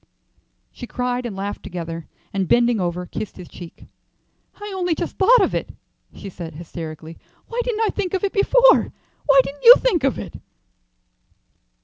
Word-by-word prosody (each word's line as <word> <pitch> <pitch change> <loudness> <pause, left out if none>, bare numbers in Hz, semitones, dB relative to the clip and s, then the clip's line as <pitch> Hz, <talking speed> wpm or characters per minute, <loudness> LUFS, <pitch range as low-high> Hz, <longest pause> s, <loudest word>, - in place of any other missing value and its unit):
She 245 - -9
cried 250 0 -2
and 210 - -7
laughed 200 +1 -5
together, 165 -2 -7 0.3
and 195 -2 -1
bending 240 -1 +3
over, 180 0 -2
kissed 205 +3 -7
his 180 -2 -10
cheek. 175 -2 -12 0.7
"I 415 -1 -8
only 360 -3 0
just - - -4
thought 450 +3 +6
of - - 0
it," - - -3 0.5
she - - -9
said, 170 -4 -8
hysterically. 160 0 -8 0.3
"Why 475 +1 -2
didn't 465 -2 -2
I 440 - +2
think 390 -3 -3
of 375 - -3
it 400 - -1
before? - - +4 0.4
Why 275 -2 +7
didn't 285 +2 -9
you 480 +1 +11
think 385 - 0
of 270 - +1
it?" - - -7
245 Hz, 165 wpm, -21 LUFS, -, 0.7 s, you